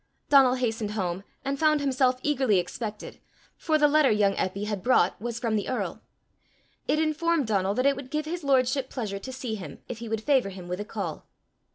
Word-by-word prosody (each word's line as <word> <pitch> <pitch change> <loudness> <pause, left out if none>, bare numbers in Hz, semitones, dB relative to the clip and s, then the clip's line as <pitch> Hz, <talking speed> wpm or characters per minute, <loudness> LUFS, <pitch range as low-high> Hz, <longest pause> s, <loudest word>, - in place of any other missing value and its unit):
Donal 270 -3 +6
hastened 225 -4 -1
home, 185 -2 -2 0.2
and 275 0 -2
found 305 -1 +4
himself 260 -2 +1
eagerly 265 -8 +2
expected, 210 +4 -4 0.4
for 315 -2 +1
the 300 -1 +5
letter 295 -2 +4
young 210 -2 +3
Eppy 195 +2 -2
had 210 -3 -3
brought 205 -7 +2
was 235 0 -3
from 230 -2 -1
the 205 - -1
earl. 255 - -3 0.9
It - - +2
informed 320 0 +1
Donal 200 -2 0
that 255 - 0
it 280 0 +4
would 265 -1 -8
give 305 +2 -2
his 340 +1 -4
lordship 265 -1 +2
pleasure 210 -6 -4
to 260 - -7
see 255 -3 -5
him, 200 -4 -8
if 235 - -6
he 230 -1 -6
would 220 -1 -2
favour 265 -7 +3
him 185 -2 -9
with 180 +2 -4
a 205 - -4
call. 195 -8 -5
250 Hz, 205 wpm, -27 LUFS, 205-280 Hz, 0.9 s, Donal